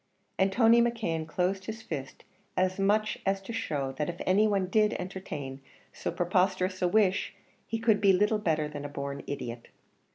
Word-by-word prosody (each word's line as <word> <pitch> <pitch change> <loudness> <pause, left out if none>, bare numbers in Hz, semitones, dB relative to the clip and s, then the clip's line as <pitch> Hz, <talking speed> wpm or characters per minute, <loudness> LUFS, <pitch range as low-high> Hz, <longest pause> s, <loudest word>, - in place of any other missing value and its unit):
And 190 0 +3
Tony 230 +2 +5
McKeon 215 -10 -1
closed 185 +3 -1
his 220 +1 -6
fist 135 -10 -6 0.3
as 185 +1 +1
much 210 +2 +2
as 195 0 +1
to 230 - -6
show 140 -11 -2
that 150 - 0
if 175 - -6
any 200 +4 +4
one 200 -3 +1
did 210 +3 +2
entertain 150 -8 -6 0.3
so - - -3
preposterous 185 +1 +1
a 180 - +3
wish 200 0 +2 0.3
he 225 - -2
could 220 -2 +2
be 200 -1 +6
little 210 +3 +3
better 155 -6 0
than 145 -1 -7
a 145 - -5
born 140 0 -5
idiot. 120 -4 -5
185 Hz, 175 wpm, -29 LUFS, 155-210 Hz, 0.3 s, be